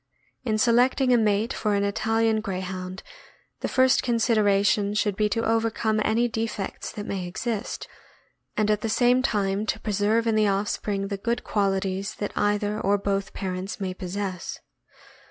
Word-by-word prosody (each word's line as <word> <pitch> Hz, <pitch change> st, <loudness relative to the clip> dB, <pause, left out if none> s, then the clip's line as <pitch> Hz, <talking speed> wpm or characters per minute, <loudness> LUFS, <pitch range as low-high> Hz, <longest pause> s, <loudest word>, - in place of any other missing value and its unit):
In 220 Hz, -4 st, 0 dB
selecting 250 Hz, +3 st, +3 dB
a -, -, +6 dB
mate 215 Hz, 0 st, +1 dB
for 210 Hz, -2 st, 0 dB
an 200 Hz, -, +1 dB
Italian 225 Hz, +2 st, +1 dB
Greyhound, 185 Hz, -2 st, -5 dB, 0.6 s
the -, -, -2 dB
first 260 Hz, 0 st, +4 dB
consideration 210 Hz, -4 st, +2 dB
should 205 Hz, -2 st, +1 dB
be 210 Hz, +1 st, +1 dB
to 230 Hz, +1 st, -1 dB
overcome 225 Hz, -1 st, +1 dB
any 235 Hz, +2 st, +2 dB
defects 225 Hz, -3 st, -4 dB
that 205 Hz, -, -6 dB
may 190 Hz, -4 st, -3 dB
exist, 220 Hz, +5 st, -4 dB, 0.7 s
and 215 Hz, 0 st, +2 dB
at 210 Hz, -, +1 dB
the 225 Hz, -, -2 dB
same 245 Hz, +3 st, +4 dB
time 205 Hz, -3 st, 0 dB
to 220 Hz, -, -1 dB
preserve 215 Hz, +2 st, +1 dB
in 225 Hz, -, +2 dB
the 215 Hz, -1 st, +3 dB
offspring 200 Hz, 0 st, -1 dB
the 200 Hz, -, -2 dB
good 235 Hz, +4 st, -2 dB
qualities 195 Hz, -1 st, -1 dB
that 205 Hz, -, -4 dB
either 205 Hz, 0 st, 0 dB
or 200 Hz, 0 st, +2 dB
both 195 Hz, 0 st, -2 dB
parents 190 Hz, +1 st, -4 dB
may 190 Hz, -2 st, -2 dB
possess. 185 Hz, 0 st, -4 dB
210 Hz, 155 wpm, -25 LUFS, 195-225 Hz, 0.7 s, a